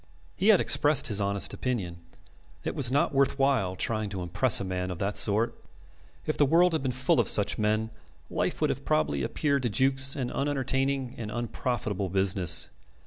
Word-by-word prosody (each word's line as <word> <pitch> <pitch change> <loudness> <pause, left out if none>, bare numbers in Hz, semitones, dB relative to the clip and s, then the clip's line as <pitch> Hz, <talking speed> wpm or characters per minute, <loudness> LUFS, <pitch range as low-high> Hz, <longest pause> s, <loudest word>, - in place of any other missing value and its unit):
He 195 - -1
had 215 -5 +6
expressed 145 0 +3
his 105 -1 +2
honest 100 0 0
opinion. 100 -10 -4 0.7
It - - -3
was 125 -3 +2
not 145 +2 +1
worthwhile 135 -7 +1
trying 110 +1 -3
to 95 -2 -5
impress 105 +8 +3
a - - -4
man 90 -1 -4
of 90 - -5
that 100 +3 -3
sort. 105 +2 +2 0.7
If 155 - -2
the 145 - +5
world 175 +4 +3
had 160 - -1
been 130 -1 -2
full 130 +2 0
of - - +1
such - - +2
men, 110 +1 0 0.4
life - - -3
would - - +2
have - - -6
probably 75 -2 0
appeared 140 - -1
to 120 - -1
Jukes 135 +4 +2
an 125 -3 -4
unentertaining 135 -2 -2
and 110 -2 -5
unprofitable 110 -3 -3
business. 95 -2 +1
120 Hz, 180 wpm, -27 LUFS, 100-135 Hz, 0.7 s, had